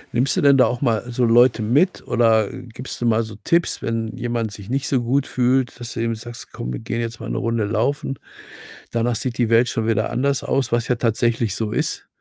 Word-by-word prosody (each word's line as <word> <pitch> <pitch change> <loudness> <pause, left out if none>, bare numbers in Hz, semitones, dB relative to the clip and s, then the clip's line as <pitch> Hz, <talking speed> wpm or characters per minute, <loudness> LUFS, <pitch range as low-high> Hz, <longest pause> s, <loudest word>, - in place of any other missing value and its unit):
Nimmst 130 +3 +2
du - - +2
denn 140 -1 +6
da 130 - +5
auch 120 0 -2
mal 115 -5 +1
so 120 0 +1
Leute 120 -1 +4
mit 145 - +1
oder, 110 -3 +3
äh, 130 - -7
gibst 125 +1 -7
du - - 0
mal 115 0 +3
so 110 -1 -8
Tipps, 170 0 +1
wenn 115 0 -3
jemand 120 -3 -2
sich 100 +1 -10
nicht 135 +1 -1
so 130 -3 +1
gut 135 +4 +1
fühlt, 125 0 +1
dass 120 0 -6
du 115 - -3
eben 115 0 0
sagst: 115 +1 -9
„Komm, 60 - -5
wir - - -4
gehen 115 +1 -3
jetzt 115 0 -5
mal - - -6
'ne - - -2
Runde 115 -2 0
laufen, 125 +6 -1 0.7
danach 115 +1 0
sieht 125 +1 -3
die 120 -3 +2
Welt 115 +1 +4
schon 115 -1 -2
wieder 110 -1 +1
anders 140 +1 0
aus“, 130 -2 0
was 120 -1 +1
ja 125 - +2
tatsächlich 115 -2 0
so 110 -2 -2
ist. - - -2
120 Hz, 235 wpm, -21 LUFS, 115-125 Hz, 0.7 s, denn